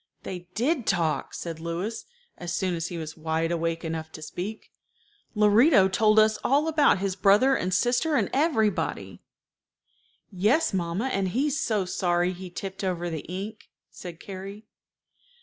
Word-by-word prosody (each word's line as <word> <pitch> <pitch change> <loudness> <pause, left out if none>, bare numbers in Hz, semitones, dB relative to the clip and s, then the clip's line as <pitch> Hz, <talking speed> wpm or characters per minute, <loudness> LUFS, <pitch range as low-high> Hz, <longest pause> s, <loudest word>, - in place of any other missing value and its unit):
"They 180 -2 -7
did 255 +2 0
talk," 165 -5 0
said 165 -2 -6
Louis, 170 +7 -4 0.3
as 175 -1 -6
soon 180 +1 0
as 165 -1 -2
he 175 - -6
was 155 -2 -6
wide 160 +1 -1
awake 165 0 -2
enough 160 -1 -4
to 155 - -8
speak. 195 +7 -6 0.6
"Lorito 210 +1 +5
told 215 +3 +3
us 215 0 +5
all 290 +4 +2
about 300 -8 +4
his 190 0 -2
brother 205 +8 +4
and 185 - -1
sister 245 - +2
and 215 -8 +2
everybody." 265 -8 0 1.1
"Yes, 215 - +2
mamma, 175 +4 -1
and 195 -1 0
he's 275 +9 0
so 210 -4 0
sorry 175 0 0
he 185 0 -8
tipped 190 +2 -6
over 175 -2 -2
the 160 -2 -4
ink," 205 +4 -6 0.2
said 175 -3 -9
Carrie. 195 +2 -8
190 Hz, 150 wpm, -26 LUFS, 175-220 Hz, 1.1 s, Lorito